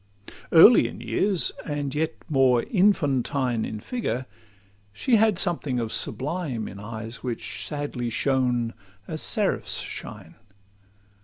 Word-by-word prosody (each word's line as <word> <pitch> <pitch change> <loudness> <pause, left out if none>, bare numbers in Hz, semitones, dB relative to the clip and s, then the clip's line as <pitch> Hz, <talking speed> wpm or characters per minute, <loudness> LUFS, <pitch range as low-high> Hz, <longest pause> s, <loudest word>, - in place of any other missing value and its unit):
Early 165 - +8
in - - -9
years, 160 - 0
and 145 -3 -3
yet 160 +2 -1
more 130 -5 +3
infantine 140 - +1
In 110 - -5
figure, 130 - -3 0.7
she 225 - +2
had 215 -3 +3
something 155 -9 0
of 115 -2 -3
sublime 140 -6 -2
In 100 - -9
eyes 110 +2 -7
which 120 -3 -4
sadly 145 -5 -3
shone, 125 -2 0 0.3
as 155 - -4
seraphs' 210 -3 +1
shine. - - -8
135 Hz, 120 wpm, -25 LUFS, 120-165 Hz, 0.7 s, Early